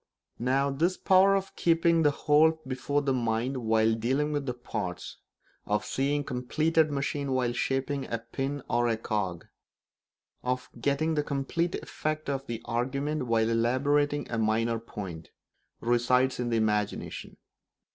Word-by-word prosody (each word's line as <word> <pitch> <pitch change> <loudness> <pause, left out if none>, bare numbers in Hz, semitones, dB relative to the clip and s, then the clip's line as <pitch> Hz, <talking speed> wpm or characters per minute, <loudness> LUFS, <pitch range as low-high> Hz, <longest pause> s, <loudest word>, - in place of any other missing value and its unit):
Now, 135 +3 +1
this 170 +7 0
power 190 +1 +5
of 195 0 -3
keeping 165 0 +3
the 150 - +5
whole 155 +2 +3
before 135 +3 -1
the 135 -1 +1
mind 120 +2 0
while 110 -2 +2
dealing 130 +7 0
with 145 -2 -2
the 125 - 0
parts, 105 -7 -5 0.5
of 105 0 0
seeing 140 +6 0
the - - -8
completed 155 +5 +1
machine 140 -1 -2
while 125 -2 +1
shaping 135 +2 -2
a 115 - 0
pin 135 +4 -4
or 120 0 +1
a 115 -1 +1
cog, 100 -6 -3 1.0
of 125 0 -3
getting 145 +5 +1
the 150 - +1
complete 145 +5 -1
effect 155 -1 -3
of 135 0 -4
the 115 -1 -5
argument 135 +4 -1
while 115 -1 +2
elaborating 140 +6 +1
a 115 - -1
minor 115 +1 +1
point, 95 -8 -8 0.5
resides 125 +2 +2
in 120 -1 -1
the 115 - +1
imagination. 105 -2 -2
130 Hz, 145 wpm, -28 LUFS, 115-145 Hz, 1.0 s, power